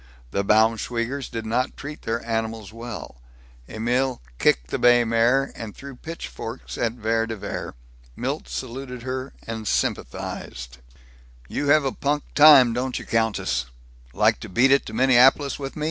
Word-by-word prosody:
The 100 - 0
Baumschweigers 115 +5 +1
did 115 -1 -5
not 120 +4 -1
treat 145 +2 -8
their 115 +1 -3
animals 110 -2 -3
well; 115 - -8 0.5
Emil 125 +4 0 0.2
kicked 60 0 +2
the - - -1
bay 120 0 +6
mare, 120 +4 +2
and 110 -3 -7
threw 140 -1 -10
pitchforks 130 -5 -7
at 115 -1 -1
Vere 115 -1 0
de 115 - -4
Vere. 100 - -6 0.4
Milt - - -3
saluted 125 - -6
her 130 +1 -4
and 110 -1 -5
sympathized: - - -3 0.7
"You 145 - -3
have 145 0 +5
a 135 - +1
punk 145 +2 -1
time, 145 -6 +8
don't 125 +1 -2
you, - - -7
countess? 110 - 0 0.5
Like - - +2
to - - -8
beat 125 +8 +4
it 140 - +3
to 110 - -7
Minneapolis 130 +4 +4
with 135 -1 -6
me?" - - -7
120 Hz, 155 wpm, -24 LUFS, 110-135 Hz, 0.7 s, time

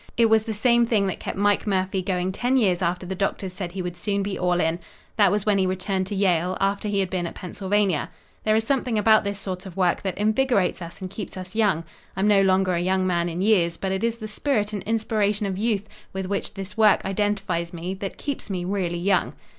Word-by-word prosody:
"It 230 -2 +4
was 220 0 +6
the 225 - -3
same 235 +2 +4
thing 220 -4 +2
that 190 - -2
kept - - -5
Mike 205 +1 +2
Murphy 190 -1 0
going 185 0 -1
ten 245 +7 +1
years 190 -7 +2
after 180 +1 -1
the 185 - -4
doctors 190 -1 -2
said 185 -2 -5
he 190 -1 -3
would 175 -1 -4
soon 200 +2 -1
be 200 0 -3
all 180 -1 +1
in. 165 0 +1 0.4
That 210 -3 +5
was 205 -1 0
when 205 -2 +3
he 190 - +2
returned 185 0 -1
to 205 - -4
Yale, 185 -2 +1
after 200 +2 0
he 200 -1 +1
had 190 - -2
been 180 -2 -1
at - - -8
Pennsylvania. 190 -3 -1 0.3
There 215 0 +3
is 220 - +2
something 250 -2 0
about 215 +1 +5
this 200 -1 -3
sort 190 -1 -5
of 185 0 -11
work 180 -2 +2
that 190 -2 -3
invigorates 215 -3 +1
us 170 +3 -9
and 185 - -5
keeps 195 -2 -7
us 185 0 -8
young. 205 -7 +2 0.3
I'm 195 +2 +2
no 205 -2 +5
longer 190 -1 +3
a 170 - 0
young 185 +1 +1
man 175 -1 +1
in 175 +3 -2
years, 175 -6 +3
but 190 - -2
it 190 +3 -2
is 230 0 0
the 215 -2 -6
spirit 215 -1 -1
and 205 - -3
inspiration 215 -2 0
of 195 -1 -2
youth 215 -2 0 0.3
with 190 0 -3
which 200 +2 -3
this 195 0 -7
work 215 -2 +4
identifies 195 -4 -1
me 175 +2 -4
that 195 0 -6
keeps 285 -6 -4
me 180 -3 -2
really 180 -3 -1
young." 185 +1 +1
195 Hz, 240 wpm, -24 LUFS, 185-210 Hz, 0.4 s, was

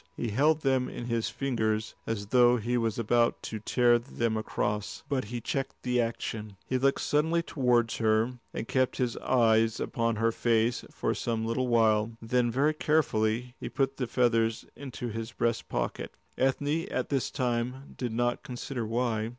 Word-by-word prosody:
He 120 - -2
held 150 +8 +3
them 130 -3 +1
in 120 - -6
his 115 -2 -1
fingers 110 -5 -1
as 110 -3 -2
though 125 0 +5
he 120 +2 -1
was 115 -2 0
about 120 +1 +2
to 110 - -4
tear 120 +2 +3
them 115 -2 -2
across. 105 -1 -2
But 135 -5 -1
he 120 +3 -4
checked 135 +4 -3
the 125 -1 +2
action. 110 -3 -4
He 130 - 0
looked 135 +1 +2
suddenly 160 +3 +1
towards 120 -7 +1
her, 110 +3 +1
and 115 - -5
kept 130 -1 +1
his 125 -3 0
eyes 115 -3 +3
upon 115 -1 0
her 115 +1 +2
face 115 +1 +1
for - - -1
some 115 -1 -2
little 120 +3 0
while. 110 -2 +3
Then 120 +1 +1
very 140 +6 +2
carefully 125 -6 +1
he - - -5
put 135 -1 -1
the 125 - -2
feathers 115 -2 +1
into 130 -3 -6
his 115 +1 -5
breast 115 -1 -1
pocket. - - -3 0.2
Ethne 145 +6 0
at - - -2
this 135 -3 0
time 125 +1 -2
did 125 -3 -3
not 120 +1 0
consider 125 -1 -5
why. 115 -1 0
120 Hz, 170 wpm, -29 LUFS, 115-130 Hz, 0.2 s, though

